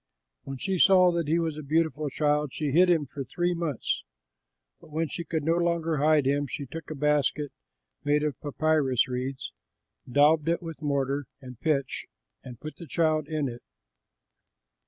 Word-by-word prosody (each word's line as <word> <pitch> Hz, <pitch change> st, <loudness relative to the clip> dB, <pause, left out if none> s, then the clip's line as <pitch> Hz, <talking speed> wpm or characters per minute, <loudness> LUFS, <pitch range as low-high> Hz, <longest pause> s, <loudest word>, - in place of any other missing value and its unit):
When 135 Hz, 0 st, -5 dB
she 190 Hz, +6 st, -2 dB
saw 185 Hz, -1 st, +6 dB
that 170 Hz, -3 st, -1 dB
he 160 Hz, +3 st, +2 dB
was 160 Hz, -3 st, -1 dB
a -, -, -5 dB
beautiful 155 Hz, 0 st, 0 dB
child, 150 Hz, -1 st, 0 dB
she 150 Hz, -3 st, -1 dB
hid 180 Hz, +5 st, +5 dB
him 165 Hz, -4 st, +3 dB
for 135 Hz, +1 st, -6 dB
three 175 Hz, +7 st, -1 dB
months. 165 Hz, -7 st, -2 dB, 0.8 s
But -, -, -17 dB
when 160 Hz, +1 st, -1 dB
she 170 Hz, -, -4 dB
could 160 Hz, -2 st, -2 dB
no 165 Hz, +3 st, +2 dB
longer 170 Hz, -2 st, 0 dB
hide 150 Hz, 0 st, +3 dB
him, 140 Hz, +1 st, +1 dB
she 140 Hz, +2 st, -5 dB
took 160 Hz, +4 st, -8 dB
a 155 Hz, -, -4 dB
basket 150 Hz, 0 st, +1 dB, 0.5 s
made 145 Hz, +1 st, +2 dB
of 150 Hz, -4 st, -2 dB
papyrus 145 Hz, -3 st, +1 dB
reeds, 130 Hz, -, -4 dB, 0.6 s
daubed 150 Hz, +3 st, +4 dB
it 170 Hz, -, +1 dB
with 165 Hz, -2 st, -7 dB
mortar 140 Hz, -2 st, -1 dB
and 125 Hz, -3 st, -11 dB
pitch, 145 Hz, -4 st, -1 dB, 0.4 s
and 125 Hz, -4 st, -10 dB
put 155 Hz, -, -8 dB
the 170 Hz, -, -10 dB
child 155 Hz, -1 st, +1 dB
in 155 Hz, -3 st, -1 dB
it. 120 Hz, -1 st, -7 dB
150 Hz, 175 wpm, -27 LUFS, 140-165 Hz, 0.8 s, saw